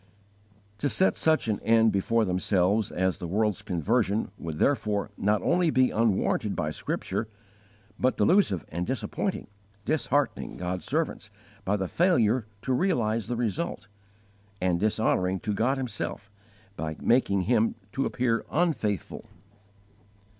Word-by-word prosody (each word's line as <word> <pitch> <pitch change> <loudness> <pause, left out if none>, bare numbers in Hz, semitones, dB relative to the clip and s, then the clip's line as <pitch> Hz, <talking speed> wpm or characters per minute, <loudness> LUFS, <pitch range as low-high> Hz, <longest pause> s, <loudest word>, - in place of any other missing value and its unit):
To 145 - 0
set 190 - +2
such 155 -6 +2
an 105 -2 0
end 115 -1 +4
before 110 +3 +1
themselves 95 +2 +1
as 95 +1 0
the 90 - -5
world's 105 +2 0
conversion 100 +3 0
would 80 -5 -6
therefore 105 - 0
not 105 -1 +1
only 175 -1 +2
be 130 -3 +3
unwarranted 110 -1 +1
by 75 - -1
Scripture, 110 - -3 0.7
but 130 +1 +1
delusive 175 - +3
and 85 +2 -3
disappointing, 130 -4 -2 0.4
disheartening 145 -2 0
God's 90 0 -4
servants - - -2 0.3
by 100 - +1
the 95 -1 -2
failure 120 - +2 0.2
to 130 - 0
realize 115 - +1
the 120 - -2
result, 120 - -3 0.7
and 90 -2 +1
dishonoring 95 -3 +1
to 105 - -2
God 125 +7 +1
Himself 100 -6 -4 0.4
by 80 -3 -4
making 115 -5 +2
Him 115 +3 +2 0.2
to 135 +6 -1
appear 115 -2 0
unfaithful. 145 - -1
110 Hz, 130 wpm, -27 LUFS, 95-125 Hz, 0.7 s, end